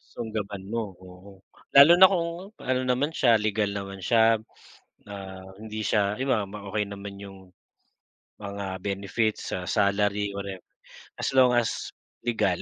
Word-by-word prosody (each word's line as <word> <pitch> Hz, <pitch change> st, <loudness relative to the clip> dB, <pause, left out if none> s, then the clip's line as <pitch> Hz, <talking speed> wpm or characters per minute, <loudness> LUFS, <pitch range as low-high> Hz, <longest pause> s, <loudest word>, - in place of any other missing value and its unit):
Sunggaban 105 Hz, -4 st, -5 dB
mo, 115 Hz, +3 st, -2 dB, 0.2 s
oo. 95 Hz, +2 st, -14 dB, 0.4 s
Lalo 140 Hz, +4 st, +8 dB
na 190 Hz, +2 st, +8 dB
kung, 170 Hz, -3 st, 0 dB, 0.3 s
ano 130 Hz, 0 st, -1 dB
naman 130 Hz, +5 st, 0 dB
siya, 115 Hz, -3 st, +4 dB
legal 105 Hz, -1 st, 0 dB
naman 100 Hz, -1 st, -6 dB
siya, 115 Hz, +2 st, +3 dB, 0.6 s
um, 95 Hz, -2 st, -9 dB
hindi 110 Hz, 0 st, -6 dB
siya 100 Hz, 0 st, +1 dB
iba, 120 Hz, -4 st, 0 dB
bam 100 Hz, -, -13 dB, 0.2 s
okey 105 Hz, 0 st, -1 dB
naman 100 Hz, 0 st, -8 dB
yung 100 Hz, -1 st, -10 dB, 1.0 s
mga 100 Hz, -2 st, -5 dB
benefits, 100 Hz, +3 st, -2 dB
ah 90 Hz, -1 st, -4 dB
salary, 105 Hz, 0 st, +1 dB
whatever, 100 Hz, -2 st, -6 dB, 0.6 s
as -, -, -1 dB
long 130 Hz, -1 st, +6 dB
as, 115 Hz, -, -2 dB, 0.4 s
legal. 100 Hz, -6 st, +1 dB
105 Hz, 140 wpm, -26 LUFS, 100-115 Hz, 1.0 s, Lalo